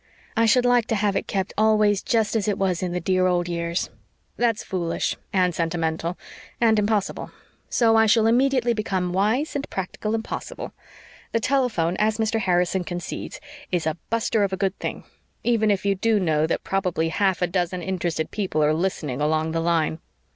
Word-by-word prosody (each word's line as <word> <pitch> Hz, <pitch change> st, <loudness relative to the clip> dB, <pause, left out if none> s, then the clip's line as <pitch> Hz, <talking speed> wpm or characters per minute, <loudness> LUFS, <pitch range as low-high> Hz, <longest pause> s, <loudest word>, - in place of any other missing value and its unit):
I 230 Hz, 0 st, +3 dB
should 250 Hz, +2 st, +4 dB
like 245 Hz, -2 st, +3 dB
to 225 Hz, -, 0 dB
have 205 Hz, -1 st, +1 dB
it 195 Hz, -, -1 dB
kept 190 Hz, -1 st, -2 dB
always 215 Hz, -2 st, +3 dB
just 225 Hz, -1 st, +1 dB
as 220 Hz, -2 st, 0 dB
it 205 Hz, -, +1 dB
was 185 Hz, -3 st, 0 dB
in 180 Hz, -1 st, -2 dB
the 180 Hz, -, -1 dB
dear 185 Hz, +1 st, +2 dB
old 175 Hz, -1 st, +1 dB
years. 170 Hz, 0 st, -2 dB, 0.4 s
That's 230 Hz, -3 st, +1 dB
foolish 170 Hz, -3 st, -2 dB, 0.2 s
and 180 Hz, -2 st, +2 dB
sentimental 165 Hz, +1 st, -2 dB, 0.4 s
and 225 Hz, -2 st, +4 dB
impossible. 205 Hz, -1 st, -1 dB, 0.4 s
So 225 Hz, -2 st, +3 dB
I 220 Hz, 0 st, +5 dB
shall 220 Hz, +1 st, +4 dB
immediately 245 Hz, +1 st, +3 dB
become 190 Hz, -5 st, -2 dB
wise 220 Hz, -, +1 dB
and 285 Hz, 0 st, -3 dB
practical 205 Hz, +3 st, -3 dB
and 225 Hz, -, -2 dB
possible. -, -, -6 dB, 0.6 s
The 230 Hz, -, +3 dB
telephone, 225 Hz, -10 st, +1 dB
as 215 Hz, 0 st, +1 dB
Mr. 225 Hz, 0 st, 0 dB
Harrison 180 Hz, -1 st, +1 dB
concedes, 175 Hz, -, -6 dB, 0.3 s
is 175 Hz, -3 st, 0 dB
'a 160 Hz, -, 0 dB
buster 225 Hz, -1 st, +1 dB
of 195 Hz, -, 0 dB
a 190 Hz, -, -2 dB
good 195 Hz, 0 st, 0 dB
thing' -, -, -4 dB, 0.4 s
even 225 Hz, -3 st, +2 dB
if 200 Hz, -1 st, +1 dB
you 200 Hz, -, +3 dB
do 215 Hz, +3 st, +1 dB
know 160 Hz, -4 st, +1 dB
that -, -, -2 dB
probably 180 Hz, -4 st, 0 dB
half 190 Hz, +1 st, +1 dB
a -, -, +5 dB
dozen 175 Hz, 0 st, -2 dB
interested 170 Hz, -4 st, -2 dB
people 185 Hz, -7 st, 0 dB
are 150 Hz, +1 st, +3 dB
listening 155 Hz, -6 st, -2 dB
along 155 Hz, +1 st, +1 dB
the 165 Hz, -, -1 dB
line." 165 Hz, -1 st, +1 dB
190 Hz, 185 wpm, -24 LUFS, 175-220 Hz, 0.6 s, I